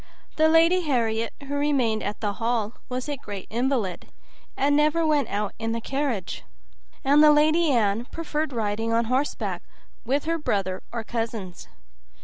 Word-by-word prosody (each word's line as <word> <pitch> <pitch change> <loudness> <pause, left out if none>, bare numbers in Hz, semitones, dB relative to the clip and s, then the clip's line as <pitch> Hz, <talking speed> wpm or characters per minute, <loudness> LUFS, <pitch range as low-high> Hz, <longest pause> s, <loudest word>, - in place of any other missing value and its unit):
The 315 0 +4
Lady 330 +3 +5
Harriet, 230 -7 0 0.2
who 285 - -4
remained 275 -7 +1
at 205 +1 -4
the 205 -2 -1
hall, 230 -1 -1 0.2
was 255 +1 -3
a 290 -1 -3
great 205 -7 -7
invalid, 235 -6 -1 0.5
and 285 +1 +3
never 305 +2 +3
went 300 -3 +2
out 205 0 -2
in 225 0 -2
the 230 - -2
carriage, 265 -6 -3 0.6
and 285 +2 +5
the 305 - +8
Lady 310 +2 +4
Anne 225 -3 +2
preferred 310 0 -3
riding 225 -1 -1
on 230 0 +2
horseback 260 +5 -1 0.4
with 275 +5 0
her 330 +1 0
brother 195 - -1
or 230 -1 -4
cousins. 225 -6 -4
250 Hz, 155 wpm, -25 LUFS, 220-295 Hz, 0.6 s, the